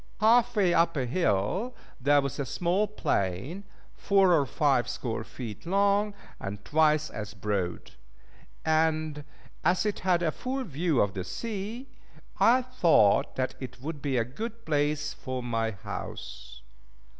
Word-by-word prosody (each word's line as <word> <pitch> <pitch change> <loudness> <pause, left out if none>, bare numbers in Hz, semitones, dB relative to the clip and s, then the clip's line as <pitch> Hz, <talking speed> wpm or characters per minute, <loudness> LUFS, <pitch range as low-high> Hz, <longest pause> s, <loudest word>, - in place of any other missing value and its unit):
Half 230 +3 +4
way 190 -5 +3
up 165 -1 +3
a 130 - 0
hill 170 - 0 0.2
there 145 +2 +4
was 140 +1 -4
a - - +1
small 180 - +1
plain, 140 - -2 0.3
four 195 -2 +3
or 145 -5 +3
five 135 -3 +2
score 120 -2 -3
feet 110 0 -8
long, 200 +2 +2 0.2
and 100 0 -6
twice 155 0 +3
as 105 -1 -6
broad; 95 -5 -3 0.7
and 155 -1 +1 0.4
as 175 +5 +2
it 210 - -1
had 180 -2 +2
a 160 - +2
full 260 +7 -3
view 165 - 0
of 100 -2 +1
the 95 - -3
sea, 220 - -5 0.5
I 250 +2 +5
thought 170 - +3
that 130 0 -1
it 130 -1 -8
would 150 +2 -6
be 135 -3 0
a 115 - +2
good 230 - -7
place 145 -1 0
for 130 -1 -5
my 115 -2 0
house. 65 - -8
150 Hz, 145 wpm, -28 LUFS, 120-195 Hz, 0.7 s, I